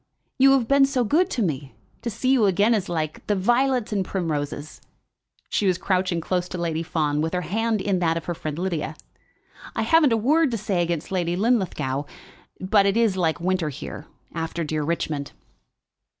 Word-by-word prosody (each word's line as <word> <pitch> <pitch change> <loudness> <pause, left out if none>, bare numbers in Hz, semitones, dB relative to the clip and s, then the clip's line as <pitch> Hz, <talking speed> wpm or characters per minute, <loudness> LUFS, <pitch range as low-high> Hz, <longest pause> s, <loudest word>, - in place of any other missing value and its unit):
"You 270 +1 +7
have 255 -4 +2
been 275 +1 +5
so 260 -2 0
good 315 - +2
to 235 - -1
me! 140 -6 -3 0.3
To 240 - -3
see 235 +4 0
you 240 -6 +4
again 205 +5 +3
is 200 -5 -1
like 155 -3 -3
the 210 - +2
violets 240 +3 +1
and 195 -2 +1
primroses." 155 -5 -4 0.7
She 205 - +1
was 180 -2 +2
crouching 185 -2 0
close 180 +2 -2
to 185 - -5
Lady 165 -2 -1
Fawn, 150 -3 0
with 160 +3 -1
her 180 - 0
hand 215 +5 -1
in 195 -2 0
that 165 -2 +1
of 165 - -5
her 175 - -2
friend 155 -2 -5
Lydia. 165 -4 -2 0.8
"I - - 0
haven't 325 -5 +4
a 230 - +3
word 295 +7 +3
to 230 - -2
say 195 -4 -1
against 170 -1 -2
Lady 175 -2 0
Linlithgow, 180 - 0 0.5
but 195 +1 +3
it 200 +3 +1
is 225 -5 +3
like 170 -3 0
winter 180 -2 0
here, 140 - -8 0.3
after 165 +1 -3
dear 155 0 -2
Richmond." 150 -2 -2
185 Hz, 190 wpm, -24 LUFS, 165-225 Hz, 0.8 s, You